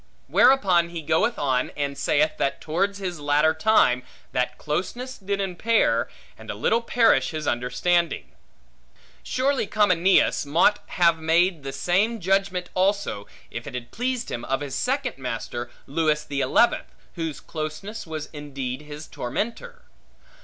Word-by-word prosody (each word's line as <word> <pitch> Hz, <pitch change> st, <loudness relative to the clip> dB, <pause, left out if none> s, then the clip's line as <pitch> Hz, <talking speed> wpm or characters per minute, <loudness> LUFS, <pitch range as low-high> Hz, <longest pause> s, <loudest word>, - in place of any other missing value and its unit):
Whereupon 185 Hz, -10 st, +4 dB
he 170 Hz, -2 st, -6 dB
goeth 160 Hz, +11 st, +1 dB
on, 130 Hz, -3 st, 0 dB
and 140 Hz, -1 st, -2 dB
saith 150 Hz, +2 st, +1 dB
that 140 Hz, 0 st, -1 dB
towards 195 Hz, +6 st, -1 dB
his 180 Hz, -4 st, -4 dB
latter 150 Hz, +2 st, +3 dB
time, 160 Hz, -, +3 dB, 0.3 s
that 125 Hz, 0 st, -1 dB
closeness 240 Hz, -, -3 dB
did 200 Hz, 0 st, -2 dB
impair, 195 Hz, +4 st, +1 dB, 0.3 s
and -, -, -12 dB
a -, -, -3 dB
little 230 Hz, -, +1 dB
perish 230 Hz, -, +3 dB
his 155 Hz, -1 st, -4 dB
understanding. 145 Hz, +8 st, 0 dB, 0.9 s
Surely 265 Hz, -3 st, 0 dB
Comineus 190 Hz, -3 st, +3 dB
mought 165 Hz, +8 st, +3 dB
have 170 Hz, -2 st, +3 dB
made 165 Hz, +1 st, +2 dB
the 135 Hz, 0 st, -5 dB
same 190 Hz, +11 st, +1 dB
judgment 190 Hz, -1 st, 0 dB
also, 190 Hz, -, 0 dB, 0.2 s
if 120 Hz, -, -6 dB
it -, -, -6 dB
had 120 Hz, -1 st, -6 dB
pleased 250 Hz, +1 st, -2 dB
him, 120 Hz, -, -4 dB
of 135 Hz, +1 st, -1 dB
his 140 Hz, -2 st, -5 dB
second 260 Hz, -, -1 dB
master, 120 Hz, -1 st, -4 dB, 0.2 s
Lewis 150 Hz, +1 st, 0 dB
the 140 Hz, -2 st, -3 dB
Eleventh, 185 Hz, -, +2 dB, 0.2 s
whose 165 Hz, -4 st, -4 dB
closeness 160 Hz, +7 st, -6 dB
was 155 Hz, -1 st, -5 dB
indeed 140 Hz, -3 st, -5 dB
his 150 Hz, +1 st, -9 dB
tormentor. 230 Hz, -, -5 dB
165 Hz, 140 wpm, -24 LUFS, 145-200 Hz, 0.9 s, Whereupon